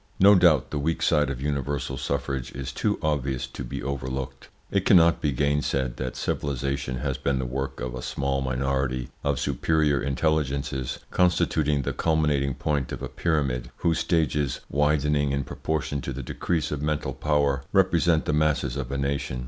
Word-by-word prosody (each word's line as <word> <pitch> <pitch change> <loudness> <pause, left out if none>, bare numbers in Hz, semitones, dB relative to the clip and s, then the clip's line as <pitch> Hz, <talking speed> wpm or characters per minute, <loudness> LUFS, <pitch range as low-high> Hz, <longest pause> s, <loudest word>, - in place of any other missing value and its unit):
No 100 +2 +8
doubt 85 -8 +4
the 75 - -1
weak 80 +3 -1
side 75 -2 +3
of 65 -1 -4
universal 70 -1 -2
suffrage 70 -2 -3
is 65 0 -5
too 105 +9 0
obvious 70 -4 0
to - - -8
be - - -5
overlooked. 65 0 -4 0.2
It 100 -1 +1
cannot 85 -4 +5
be 75 - +1
gainsaid 70 -2 0
that 65 -1 -4
civilisation 70 -2 -2
has 65 0 -2
been 70 0 0
the 65 - -2
work 65 +2 -4
of 65 -1 -4
a 65 - -5
small 70 +1 -1
minority 65 -1 -1
of 70 -2 0
superior 75 -3 +1
intelligences 70 -2 -1
constituting 75 -5 +2
the - - -2
culminating 75 -4 +1
point 75 -4 -1
of - - -5
a - - -4
pyramid, 70 -7 -1
whose 80 -1 +1
stages, 75 -5 0
widening 75 -1 +2
in 70 0 0
proportion 70 +1 -3
to 70 - -4
the 70 +1 -5
decrease 80 +4 -2
of 75 -1 -3
mental 75 0 -1
power, 70 -2 +1
represent 85 -4 +3
the 75 - 0
masses 75 -4 +1
of 65 -2 -4
a 70 - -1
nation. 70 -2 -2
70 Hz, 170 wpm, -26 LUFS, 65-75 Hz, 0.2 s, No